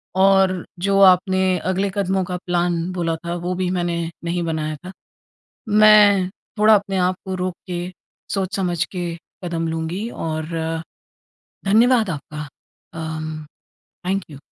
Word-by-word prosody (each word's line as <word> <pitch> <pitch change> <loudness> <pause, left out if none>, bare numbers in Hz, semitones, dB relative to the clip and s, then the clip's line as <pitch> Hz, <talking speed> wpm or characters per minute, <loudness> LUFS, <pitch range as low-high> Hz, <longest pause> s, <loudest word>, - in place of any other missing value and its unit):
और 190 -1 +4
जो 195 +2 +2
आपने 185 0 +5
अगले 195 +2 0
कदमों 190 -1 +1
का 180 0 -3
प्लान 175 -1 +1
बोला 170 -2 -1
था 170 0 -2
वो 175 +1 -3
भी 185 0 -1
मैंने 175 -2 -1 0.2
नहीं 175 +1 -1
बनाया 155 -2 -2
था। 185 - -6 0.8
मैं 210 -3 +6 0.3
थोड़ा 215 +1 +7
अपने 195 -1 0
आप 180 +1 +2
को 190 - -3
रोक 185 -1 -2
के, 180 0 -4 0.4
सोच 195 -1 -2
समझ 180 -2 0
के 175 -3 -4 0.3
कदम 165 -1 -2
लूँगी 165 +7 -3
और 160 -1 -3 1.2
धन्यवाद 225 +1 +4
आपका। 150 -1 -6 0.5
अम 155 -1 -5 0.6
थैंक 195 +1 0
यू। 145 - -10
180 Hz, 135 wpm, -21 LUFS, 170-195 Hz, 1.2 s, थोड़ा